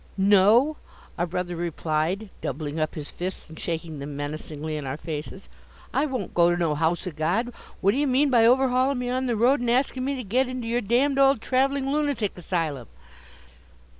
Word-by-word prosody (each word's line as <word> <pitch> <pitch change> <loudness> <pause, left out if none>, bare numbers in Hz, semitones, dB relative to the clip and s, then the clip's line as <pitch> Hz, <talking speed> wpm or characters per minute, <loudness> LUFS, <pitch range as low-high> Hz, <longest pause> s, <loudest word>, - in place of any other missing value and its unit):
"No!" 205 +9 +5 0.4
our 175 - -1
brother 175 0 -3
replied, 170 +4 -2
doubling 145 +2 -4
up 155 0 -1
his 150 -2 -6
fists 185 +1 -5
and 160 - -12
shaking 160 -2 -4
them 140 0 -6
menacingly 155 +1 -5
in 145 -3 -4
our 130 +2 -3
faces: 155 +4 -6 0.5
"I 290 +3 +2
won't 255 -9 -4
go 170 0 +4
to 175 - +1
no 165 -3 +1
house 160 +4 0
o' 180 - -3
God. 175 +11 -1 0.3
What 195 - +4
d'ye 285 +6 +1
mean 270 +2 +3
by 230 -2 +5
overhauling 260 +1 +3
me 245 0 -2
on 255 +1 -1
the 240 - 0
road, 245 +6 +3
and 245 -1 -1
askin' 255 +1 +1
me 275 +1 -1
to 255 - -5
git 250 +6 +1
into 255 -2 -5
yer 240 +1 0
d 240 +6 +3
d 275 -1 -1
old 275 -2 +5
traveling 270 +3 +1
lunatic 285 -8 0
asylum?" 160 - -3
200 Hz, 195 wpm, -25 LUFS, 160-255 Hz, 0.5 s, No